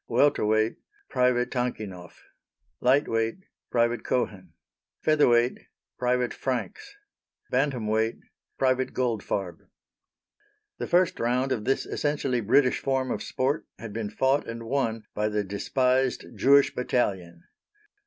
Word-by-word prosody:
Welter 135 +3 +3
weight 110 +1 +2 0.3
Private 125 -1 +2
Tankinoff. 105 -8 -4 0.6
Light 135 +4 +3
weight 115 +11 -1 0.3
Private 120 0 +1
Cohen. 95 -9 -2 0.5
Feather 155 -1 +4
weight 120 +1 +3 0.4
Private 125 0 +1
Franks. 405 - -4 0.6
Bantam 130 -6 0
weight 110 +1 0 0.4
Private 130 0 +1
Goldfarb. 105 -7 -2 1.2
The - - -3
first 180 0 +2
round 125 +3 0
of 105 -5 -1
this 135 - +1
essentially 140 -4 -1
British 125 +5 +3
form 130 -1 -1
of - - -2
sport 135 +4 -1
had 110 -1 -8
been 110 -1 -3
fought 135 +6 +1
and 115 0 -6
won 115 -3 -1
by 105 0 0
the 105 -1 -1
despised 125 +6 0
Jewish 140 +1 +4
Battalion! 95 -9 -1
125 Hz, 120 wpm, -26 LUFS, 110-130 Hz, 1.2 s, Feather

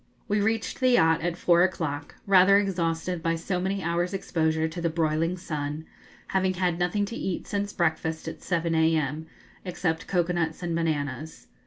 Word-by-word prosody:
We 205 0 +1
reached 220 +1 -1
the 255 -1 +3
yacht 165 -9 +4
at 175 +1 -2
four 175 -1 +4
o'clock, 160 -5 -1
rather 195 0 +6
exhausted 175 -3 -1
by 165 0 +1
so 180 +2 -2
many 190 +1 -2
hours' 175 +3 0
exposure 160 -3 0
to 165 +2 -6
the 170 - +1
broiling 165 +2 0
sun, 150 -3 -4 0.4
having 190 -1 +1
had 180 -2 0
nothing 205 +4 +1
to 230 - -6
eat 190 -5 -3
since 205 0 -2
breakfast, 160 -2 -1
at 160 -1 -6
7 170 -2 -1
a.m., 160 -1 +1 0.4
except 170 -3 -2
cocoa 180 -1 +1
nuts 165 0 -2
and 170 -1 -1
bananas. 155 -2 -2
170 Hz, 170 wpm, -26 LUFS, 160-185 Hz, 0.4 s, rather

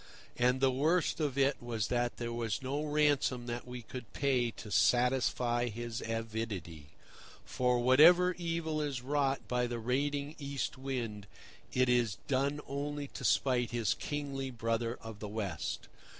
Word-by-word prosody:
And 125 +1 +2
the 135 -1 +5
worst 155 +8 +1
of 145 -4 -1
it 140 +1 +2
was 115 -3 -2
that 120 -1 0
there 120 -1 -3
was 115 0 -2
no 140 +3 -1
ransom 145 -5 +2
that 120 +1 -5
we 125 -1 -7
could 125 +1 -9
pay 130 -4 +1
to 110 -2 -10
satisfy 120 +2 +2
his 120 +1 -5
avidity; 110 -9 -4 0.6
for 125 -1 +1
whatever 165 +9 +7
evil 165 -3 -2
is 140 -5 -3
wrought 140 0 0
by 125 0 +1
the 120 0 -3
raiding 140 +5 -1
East 140 -2 -3
Wind, 120 -7 -4 0.4
it 130 0 +3
is 120 -5 +2
done 140 +2 +1
only 145 0 -3
to - - -8
spite 125 -3 +2
his 115 -4 +1
kingly 140 -2 -4
brother 115 0 -1
of 115 -2 -8
the 105 - -5
West. 100 -7 -3
125 Hz, 150 wpm, -33 LUFS, 115-140 Hz, 0.6 s, whatever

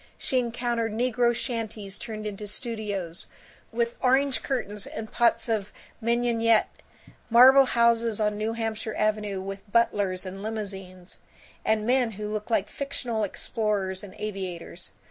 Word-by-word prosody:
She 260 - +1
encountered 235 -2 -1
negro 240 +1 +2
shanties 220 -5 -4
turned 215 -2 -6
into 210 0 -5
studios, 205 -6 -3 0.4
with 235 +1 0
orange 265 +1 +3
curtains 210 -6 -2
and 220 0 -6
pots 230 -1 +2
of 210 -3 -1 0.3
mignonette; 230 -1 +2 0.5
marble 260 +4 +9
houses 235 -2 +3
on 210 -1 +1
New 215 +2 -1
Hampshire 225 -1 -3
Avenue, 210 -2 0
with 195 +2 -7
butlers 200 -5 +2
and 190 +1 -6
limousines; 195 -4 -6 0.4
and 215 -1 +1
men 245 -2 +2
who 210 +1 -4
looked 210 +1 -4
like 210 -3 +2
fictional 245 -3 -3
explorers 200 -2 -1
and 195 -2 -10
aviators. 185 -4 -5
220 Hz, 130 wpm, -27 LUFS, 205-235 Hz, 0.5 s, marble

